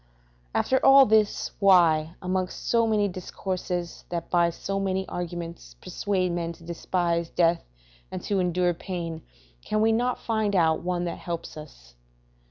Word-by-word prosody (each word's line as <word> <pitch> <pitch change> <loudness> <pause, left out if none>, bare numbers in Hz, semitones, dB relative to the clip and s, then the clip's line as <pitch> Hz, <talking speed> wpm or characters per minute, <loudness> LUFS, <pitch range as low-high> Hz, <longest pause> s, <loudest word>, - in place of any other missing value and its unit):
After 260 - +1
all 270 0 +8
this, 215 -2 +2
why, 170 -5 +4
amongst 185 0 -3
so 230 -1 +3
many 210 -2 +2
discourses 180 -1 -4
that 170 -1 -4
by 170 -1 +4
so 195 +3 -4
many 190 -1 -1
arguments 170 - -6
persuade 185 - -1
men 170 -1 -3
to 170 - -17
despise 170 0 -1
death 170 -1 +2 0.5
and - - -4
to 200 -2 0
endure 180 0 +1
pain, 170 -2 -5 0.4
can 215 - -1
we 220 +1 +4
not 245 +3 +1
find 220 -3 -1
out 160 -3 +3
one 175 0 -2
that 170 - -4
helps 170 -1 -6
us? 125 - -12
180 Hz, 150 wpm, -26 LUFS, 170-195 Hz, 0.5 s, all